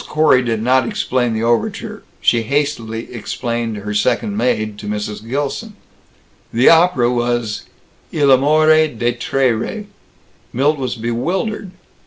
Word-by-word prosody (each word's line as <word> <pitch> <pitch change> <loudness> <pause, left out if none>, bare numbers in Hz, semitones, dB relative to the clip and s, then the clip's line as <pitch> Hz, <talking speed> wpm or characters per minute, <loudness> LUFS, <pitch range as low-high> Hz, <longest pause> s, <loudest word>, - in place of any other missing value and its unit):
Corey 150 -4 +4
did 115 -3 -2
not 130 0 +3
explain 120 -2 -1
the 110 - -2
overture. 115 0 -1 0.2
She 115 - +3
hastily 115 -3 -2
explained 115 -1 -3
her 105 +1 -5
second 200 - 0
maid, 110 - -1
to 105 - -8
Mrs. 105 0 -4
Gilson. 145 - -3 0.8
The 120 +3 +5
opera 165 -8 +4
was 120 -3 -1 0.5
Il 145 -3 +3
Amore 155 +4 +5
dei 120 -3 -1
Tre 125 +2 0
Re. 120 - -4 0.7
Milt 145 +4 +1
was 130 -2 -2
bewildered. 170 - -2
125 Hz, 130 wpm, -18 LUFS, 115-145 Hz, 0.8 s, The